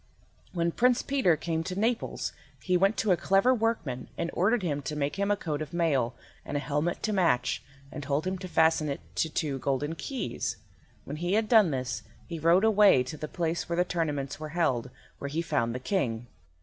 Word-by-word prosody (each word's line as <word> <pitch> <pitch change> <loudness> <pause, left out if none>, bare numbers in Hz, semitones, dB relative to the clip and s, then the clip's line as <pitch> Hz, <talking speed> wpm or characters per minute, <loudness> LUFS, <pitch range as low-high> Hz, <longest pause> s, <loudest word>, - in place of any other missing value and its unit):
When 170 -1 0
Prince 250 +5 +3
Peter 260 - +2
came 160 +1 -2
to 185 +2 -4
Naples 230 +2 -1 0.3
he 185 - +1
went 195 +4 +3
to 215 - +2
a - - +6
clever 195 +9 +3
workman, 215 - -1
and 170 - -2
ordered 210 +4 +2
him 145 -4 -1
to 150 +2 -4
make 145 +2 -2
him 200 0 0
a 205 - +2
coat 155 -5 -3
of 155 0 -6
mail, 135 -8 +1 0.3
and 145 - -3
a - - 0
helmet 150 +4 -1
to 215 - 0
match, 165 -11 +2 0.3
and 150 - -6
told 145 +3 -1
him 185 0 -2
to 185 - -6
fasten 160 -2 +3
to 140 - 0
it - - -10
two 145 - -1
golden 140 +4 -1
keys. 260 +10 -3 0.5
When 145 - -5
he 175 +3 -1
had 220 +1 +2
done 215 -5 +6
this 130 -5 -2 0.2
he 170 -2 -6
rode 170 +5 +4
away 210 -11 +6
to 130 +4 -7
the 155 0 -5
place 170 +1 -2
where 170 - -1
the 180 - +3
tournaments 145 -6 -2
were 155 0 -5
held, 130 -7 +1 0.3
where 140 - -4
he 160 +4 -1
found 120 -7 0
the - - -2
King. 125 - -1
165 Hz, 210 wpm, -28 LUFS, 145-190 Hz, 0.5 s, a